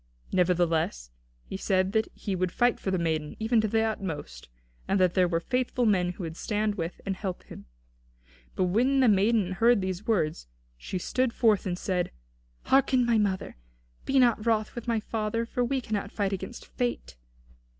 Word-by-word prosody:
Nevertheless, 165 Hz, -, +1 dB, 0.3 s
he -, -, -6 dB
said 190 Hz, -1 st, +1 dB
that 220 Hz, +1 st, +1 dB
he 200 Hz, -3 st, -3 dB
would 185 Hz, -1 st, -1 dB
fight 245 Hz, +4 st, +2 dB
for -, -, -3 dB
the 190 Hz, -, +1 dB
maiden, 160 Hz, -3 st, -1 dB
even 225 Hz, +1 st, +2 dB
to 220 Hz, -, 0 dB
the 220 Hz, +2 st, +1 dB
utmost; 165 Hz, -, -4 dB, 0.4 s
and 195 Hz, -, +1 dB
that 180 Hz, -2 st, +3 dB
there 185 Hz, -2 st, +3 dB
were 165 Hz, -1 st, 0 dB
faithful 250 Hz, +4 st, -1 dB
men 180 Hz, -4 st, +2 dB
who 180 Hz, -, -8 dB
would 160 Hz, -1 st, -5 dB
stand 210 Hz, +2 st, -1 dB
with 170 Hz, -3 st, -5 dB
and 195 Hz, -1 st, -1 dB
help 190 Hz, -2 st, -5 dB
him. -, -, -12 dB, 0.9 s
But -, -, +1 dB
when 240 Hz, +9 st, +2 dB
the 255 Hz, -, +5 dB
maiden 205 Hz, -1 st, +3 dB
heard 230 Hz, +4 st, +4 dB
these 185 Hz, +1 st, -4 dB
words, 155 Hz, -, 0 dB, 0.3 s
she -, -, -5 dB
stood 255 Hz, +6 st, 0 dB
forth 215 Hz, -5 st, +2 dB
and 175 Hz, -1 st, -2 dB
said: 180 Hz, -2 st, -1 dB, 0.5 s
"Hearken, 265 Hz, -2 st, +3 dB
my 235 Hz, -2 st, +3 dB
mother. 190 Hz, -, -1 dB, 0.5 s
Be 270 Hz, -, +1 dB
not 240 Hz, -4 st, +4 dB
wroth 220 Hz, -2 st, +1 dB
with 240 Hz, 0 st, -7 dB
my 230 Hz, -2 st, +1 dB
father, 220 Hz, +1 st, -2 dB
for 245 Hz, +1 st, -1 dB
we 265 Hz, +2 st, 0 dB
cannot 210 Hz, -4 st, -3 dB
fight 200 Hz, -2 st, -1 dB
against 210 Hz, +5 st, -6 dB
Fate. 245 Hz, -, -3 dB
200 Hz, 180 wpm, -28 LUFS, 180-230 Hz, 0.9 s, the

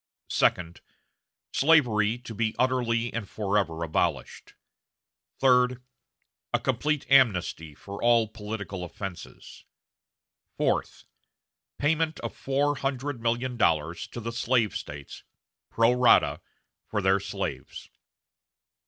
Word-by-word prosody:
Second. 85 Hz, -1 st, +1 dB, 0.7 s
Slavery 120 Hz, -8 st, +3 dB
to 120 Hz, -2 st, -9 dB
be 110 Hz, 0 st, -1 dB
utterly 120 Hz, -2 st, 0 dB
and 115 Hz, -3 st, -4 dB
forever 100 Hz, -6 st, -1 dB
abolished. 80 Hz, -, -2 dB, 0.8 s
Third. 125 Hz, -1 st, +4 dB, 0.7 s
A -, -, +2 dB
complete 145 Hz, +3 st, -1 dB
amnesty 90 Hz, -, +2 dB
for 100 Hz, +5 st, -9 dB
all 120 Hz, -2 st, +4 dB
political 105 Hz, -3 st, -6 dB
offenses. 90 Hz, +1 st, -9 dB, 0.9 s
Fourth. -, -, -1 dB, 0.7 s
Payment 160 Hz, +2 st, 0 dB
of -, -, -5 dB
four 145 Hz, +2 st, 0 dB
hundred 135 Hz, -1 st, -3 dB
million 120 Hz, +2 st, -1 dB
dollars 80 Hz, -4 st, +1 dB
to -, -, -8 dB
the 115 Hz, 0 st, -4 dB
slave 115 Hz, -1 st, +1 dB
States, 70 Hz, -1 st, -8 dB, 0.5 s
pro 115 Hz, +1 st, +3 dB
rata, 115 Hz, -12 st, +4 dB, 0.5 s
for 105 Hz, -, -2 dB
their 95 Hz, +1 st, +3 dB
slaves. -, -, -5 dB
115 Hz, 100 wpm, -27 LUFS, 100-130 Hz, 0.9 s, Third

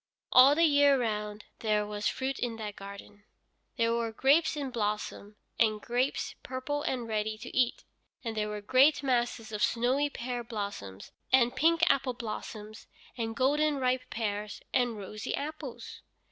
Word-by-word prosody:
All 265 Hz, +3 st, +8 dB
the 330 Hz, -, +3 dB
year 285 Hz, -3 st, +5 dB
round 210 Hz, -2 st, -3 dB
there 210 Hz, -2 st, +1 dB
was 210 Hz, 0 st, -2 dB
fruit 265 Hz, +1 st, -2 dB
in 240 Hz, -2 st, -2 dB
that 210 Hz, -2 st, -6 dB
garden. 200 Hz, +1 st, -11 dB, 0.5 s
There 230 Hz, -1 st, +2 dB
were 230 Hz, -1 st, -1 dB
grapes 295 Hz, +7 st, +3 dB
in 275 Hz, -3 st, -3 dB
blossom, 210 Hz, -2 st, -3 dB, 0.2 s
and 215 Hz, -2 st, +3 dB
grapes 245 Hz, +5 st, -1 dB
purple 260 Hz, +3 st, -3 dB
and 250 Hz, -5 st, -2 dB
ready 215 Hz, 0 st, -1 dB
to 230 Hz, +3 st, -9 dB
eat, 250 Hz, -2 st, +1 dB, 0.4 s
and 225 Hz, -2 st, -3 dB
there 210 Hz, -1 st, -1 dB
were 210 Hz, 0 st, -5 dB
great 270 Hz, +7 st, +4 dB
masses 240 Hz, -3 st, 0 dB
of 210 Hz, -1 st, -4 dB
snowy 255 Hz, +5 st, +2 dB
pear 245 Hz, -2 st, -4 dB
blossom, 200 Hz, -, -5 dB, 0.3 s
and 245 Hz, -2 st, +4 dB
pink 330 Hz, +1 st, +3 dB
apple 265 Hz, -2 st, +2 dB
blossom, 215 Hz, -2 st, -6 dB, 0.4 s
and 225 Hz, -2 st, -3 dB
golden 290 Hz, +4 st, +2 dB
ripe 255 Hz, -1 st, 0 dB
pears, 210 Hz, -2 st, -3 dB
and 245 Hz, -3 st, +1 dB
rosy 210 Hz, +1 st, -4 dB
apples. 295 Hz, -3 st, -7 dB
235 Hz, 155 wpm, -30 LUFS, 210-265 Hz, 0.5 s, All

